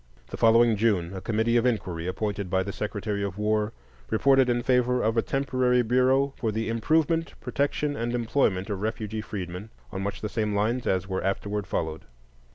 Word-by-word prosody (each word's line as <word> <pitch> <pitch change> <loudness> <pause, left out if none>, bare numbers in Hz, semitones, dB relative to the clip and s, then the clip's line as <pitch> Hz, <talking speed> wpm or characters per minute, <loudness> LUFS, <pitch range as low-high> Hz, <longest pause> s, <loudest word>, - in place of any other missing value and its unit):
The - - -4
following 115 -1 +5
June 100 -5 +1
a 95 - -6
committee 115 +3 +1
of 120 - +2
inquiry, 90 -8 -2
appointed 100 0 -3
by 95 +1 +1
the 100 +1 -5
Secretary 105 -1 -3
of 100 -1 -4
War, 105 0 +1 0.4
reported 135 +3 +4
in 120 0 +1
favor 125 0 +2
of 110 +1 +1
a 115 - +3
temporary 130 -2 +1
bureau 130 +3 +2
for 115 -5 -1
the 110 +1 -2
"improvement, 160 +8 +1
protection, 145 +1 -1
and 120 -1 -2
employment 115 -5 0
of 100 -1 -3
refugee 110 0 -3
freedmen," 95 0 -6 0.2
on 95 -2 -4
much 100 +1 -4
the 105 - -2
same 105 -1 -1
lines 115 +5 0
as 95 0 0
were 95 -1 -2
afterwards 100 +1 -2
followed. 80 -1 -3
110 Hz, 180 wpm, -26 LUFS, 100-125 Hz, 0.4 s, following